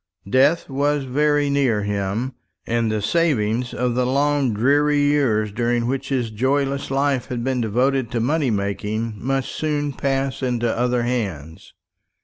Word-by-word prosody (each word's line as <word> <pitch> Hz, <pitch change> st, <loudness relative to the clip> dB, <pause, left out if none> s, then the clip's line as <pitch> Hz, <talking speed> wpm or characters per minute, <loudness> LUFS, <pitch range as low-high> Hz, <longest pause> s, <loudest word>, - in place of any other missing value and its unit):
Death 135 Hz, +9 st, +3 dB
was 145 Hz, +1 st, 0 dB
very 145 Hz, +2 st, +1 dB
near 135 Hz, -7 st, +1 dB
him, 105 Hz, +5 st, -2 dB, 0.3 s
and 115 Hz, -1 st, 0 dB
the 105 Hz, -1 st, -2 dB
savings 120 Hz, -5 st, +1 dB
of 125 Hz, -1 st, -1 dB
the 125 Hz, +1 st, +1 dB
long 140 Hz, 0 st, +1 dB
dreary 145 Hz, +7 st, +2 dB
years 135 Hz, -8 st, +2 dB
during 120 Hz, +2 st, 0 dB
which 135 Hz, +2 st, -2 dB
his 125 Hz, -5 st, -1 dB
joyless 135 Hz, +4 st, 0 dB
life 135 Hz, -1 st, 0 dB
had 120 Hz, -2 st, -4 dB
been 130 Hz, -1 st, 0 dB
devoted 125 Hz, +3 st, +1 dB
to 120 Hz, -, -2 dB
money 140 Hz, +4 st, +1 dB
making 105 Hz, +2 st, -2 dB
must 135 Hz, 0 st, -1 dB
soon 145 Hz, -2 st, -2 dB
pass 135 Hz, 0 st, -1 dB
into 120 Hz, -3 st, 0 dB
other 125 Hz, 0 st, +1 dB
hands. 95 Hz, -, -4 dB
125 Hz, 145 wpm, -21 LUFS, 115-140 Hz, 0.3 s, Death